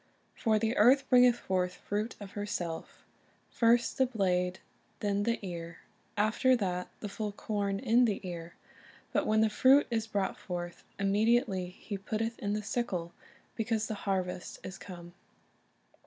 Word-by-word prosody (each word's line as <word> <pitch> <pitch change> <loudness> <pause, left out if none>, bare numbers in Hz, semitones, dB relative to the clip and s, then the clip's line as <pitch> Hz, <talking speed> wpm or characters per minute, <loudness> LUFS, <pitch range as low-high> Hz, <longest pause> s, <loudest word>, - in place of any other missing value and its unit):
For 220 -2 +2
the 225 +2 0
earth 260 +6 +6
bringeth 250 -1 +7
forth 180 -4 -1
fruit 210 +3 -3
of 200 -2 -8
herself; 175 -5 -5 0.5
first 235 +2 +3
the 260 - +5
blade, 185 -5 0 0.4
then 205 -1 0
the 230 +3 +1
ear, 170 -2 -6 0.4
after 220 +5 +3
that 180 -5 -2
the 210 - -3
full 210 +1 -4
corn 200 -1 -2
in 245 +2 +4
the 210 -4 0
ear. 170 -1 -7 0.6
But - - +1
when 215 0 +4
the 220 - +5
fruit 265 +6 +6
is 225 -1 0
brought 200 -3 -1
forth, 175 -1 -5
immediately 200 -1 +2
he 200 +2 -7
putteth 225 +3 -3
in 205 -1 -1
the 210 0 -2
sickle, 195 -6 -2 0.4
because 225 -1 0
the 215 - -3 0.2
harvest 180 -2 -2
is 185 - -7
come." 175 -2 -10
205 Hz, 150 wpm, -31 LUFS, 185-225 Hz, 0.6 s, bringeth